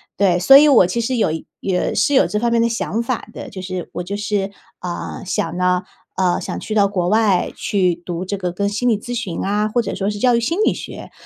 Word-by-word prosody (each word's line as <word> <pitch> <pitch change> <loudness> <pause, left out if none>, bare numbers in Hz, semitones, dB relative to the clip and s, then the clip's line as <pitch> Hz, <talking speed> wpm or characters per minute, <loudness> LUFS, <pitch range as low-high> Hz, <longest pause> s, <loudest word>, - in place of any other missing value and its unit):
对， 180 -3 +2
所 270 +9 +8
以 300 +1 +6
我 225 -10 +6
其 235 +5 -1
实 250 +2 -1
有 220 - +2 0.3
也 185 -2 -1
是 285 - +2
有 265 - +5
这 210 - -1
方 235 +1 +1
面 235 - +3
的 235 - +2
想 230 0 -2
法 245 0 -3
的， - - -8
就 190 - -8
是 185 -1 -5
我 - - -3
就 200 +3 -5
是， 205 -1 -2 0.3
呃， 180 +2 -5
想 170 -1 -2
呢 180 0 +1 0.3
呃， 185 -2 +1
想 - - -5
去 215 - -5
到 205 -2 +4
国 180 -3 -1
外 210 -4 +2
去 185 -4 0
读 175 +1 -5
这 200 +2 -3
个 180 -2 -3
跟 200 +2 -1
心 210 +4 -1
理 225 -4 +3
咨 245 +4 -7
询 205 -8 -3
啊， 210 +2 0
或 240 +3 +1
者 - - -4
说 195 +1 -1
是 205 -1 -4
教 245 0 +3
育 - - +2
心 330 - -1
理 - - +3
学， - - -9
200 Hz, 265 characters per minute, -19 LUFS, 180-230 Hz, 0.3 s, 所